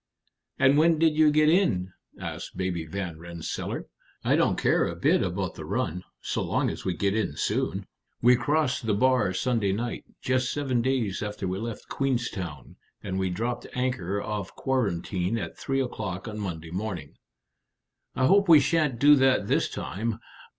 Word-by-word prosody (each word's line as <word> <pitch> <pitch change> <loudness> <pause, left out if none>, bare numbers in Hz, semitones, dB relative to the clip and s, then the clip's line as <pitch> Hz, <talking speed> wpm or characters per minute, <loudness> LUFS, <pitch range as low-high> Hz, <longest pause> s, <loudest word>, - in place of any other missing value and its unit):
"And 135 +2 +5
when 165 +1 +4
did 160 -1 +3
you 155 0 +6
get 150 +1 +4
in?" 155 - +2 0.3
asked - - -6
Baby 90 -3 -2
Van 90 -2 -5
Rensselaer. 85 -1 -5 0.4
"I - - +3
don't - - +2
care - - +2
a - - -4
bit - - +3
about - - -2
the - - -8
run, 90 +3 -2 0.2
so - - -2
long - - 0
as - - -7
we 90 - -1
get 100 +3 +1
in 105 -9 -1
soon." - - -1 0.3
"We 125 +2 +6
crossed 135 0 0
the 105 - +2
bar 125 -3 +3
Sunday 110 0 0
night, 120 +4 -3
just 130 -1 0
seven 135 -5 0
days 120 -6 0
after 105 -2 -3
we 95 +1 -2
left 115 0 -6
Queenstown, 120 - -3 0.3
and 95 -1 -2
we 95 -1 0
dropped 120 +6 -3
anchor 105 -7 -1
off 105 -2 -4
Quarantine 100 -5 -1
at 85 -7 -5
three 135 0 -1
o'clock 105 -7 -4
on 105 -1 -5
Monday 85 -5 -5
morning." 90 -6 -4 1.0
"I 130 - +2
hope 195 +4 +4
we 160 -3 +10
sha'n't 150 -6 +1
do 145 +4 +7
that 130 -6 +3
this - - +1
time. 110 +4 -3
110 Hz, 170 wpm, -27 LUFS, 95-130 Hz, 1.0 s, we